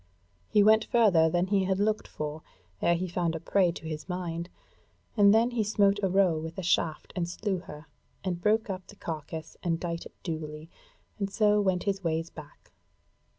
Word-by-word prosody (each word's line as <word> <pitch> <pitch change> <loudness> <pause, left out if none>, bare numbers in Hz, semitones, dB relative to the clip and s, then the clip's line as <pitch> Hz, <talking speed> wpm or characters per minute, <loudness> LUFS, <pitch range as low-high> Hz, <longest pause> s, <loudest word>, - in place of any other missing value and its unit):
He 205 - +5
went 220 +1 +5
further 190 -9 +4
than 175 +2 +1
he 195 0 +1
had 190 0 +1
looked 215 +1 0
for, 155 +1 -5 0.4
ere 170 - +3
he 185 +2 -2
found 170 -2 -1
a - - -3
prey 180 +1 +2
to 160 - -8
his 155 +2 -6
mind, 175 -1 -4 0.7
and 200 -2 +6
then 230 +3 +4
he 235 -2 0
smote 205 -1 +2
a 195 - +1
roe 185 -4 +3
with 160 +3 -7
a 190 - -4
shaft 165 -2 0
and 175 -1 -1
slew 190 +1 -2
her, 150 -3 -11 0.4
and 180 -3 -2
broke 215 +3 +2
up 185 -2 -5
the - - -13
carcase 160 0 -6
and 165 -2 -1
dight 170 -1 -4
it - - -26
duly, 155 -1 -5 0.5
and 200 -1 -2
so 210 -1 +3
went 185 -3 +1
his 195 -1 -1
ways 165 0 -1
back. 150 -2 -13
180 Hz, 195 wpm, -28 LUFS, 165-200 Hz, 0.7 s, and